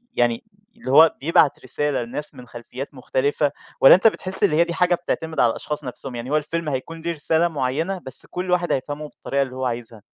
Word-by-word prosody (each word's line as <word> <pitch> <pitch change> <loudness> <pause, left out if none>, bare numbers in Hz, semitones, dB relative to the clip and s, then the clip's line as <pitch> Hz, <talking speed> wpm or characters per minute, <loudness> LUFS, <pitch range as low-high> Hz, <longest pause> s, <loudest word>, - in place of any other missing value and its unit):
يعني 120 -1 +1 0.3
اللي 230 - -5
هو 155 +3 +6
بيبعت 150 -1 +2
رسالة 130 0 -1
لناس 145 +6 -5
من 125 - -12
خلفيات 125 +4 -9
مختلفة؟ 140 +2 -1 0.3
والّا 135 - +9
أنت 185 +5 +4
بتحس 190 -3 +5
إن - - +4
هي 155 +3 +4
دي 170 0 -5
حاجة 180 +1 +2
بتعتمد 160 -2 -4
على 120 - +4
الأشخاص 150 +6 -5
نفسهم؟ 125 0 -7
يعني 120 +2 -6
هو 150 - +3
الفيلم 155 +1 -3
هيكون 150 +5 -5
له 170 +1 -2
رسالة 160 +1 +1
معينة 160 +5 -2
بس 130 - -1
كل 180 0 -5
واحد 175 -1 +1
هيفهمه 145 +3 -3
بالطريقة 140 -1 -3
اللي 130 -2 -3
هو 130 0 -3
عايزها. 115 -3 -5
145 Hz, 205 wpm, -22 LUFS, 130-165 Hz, 0.3 s, والّا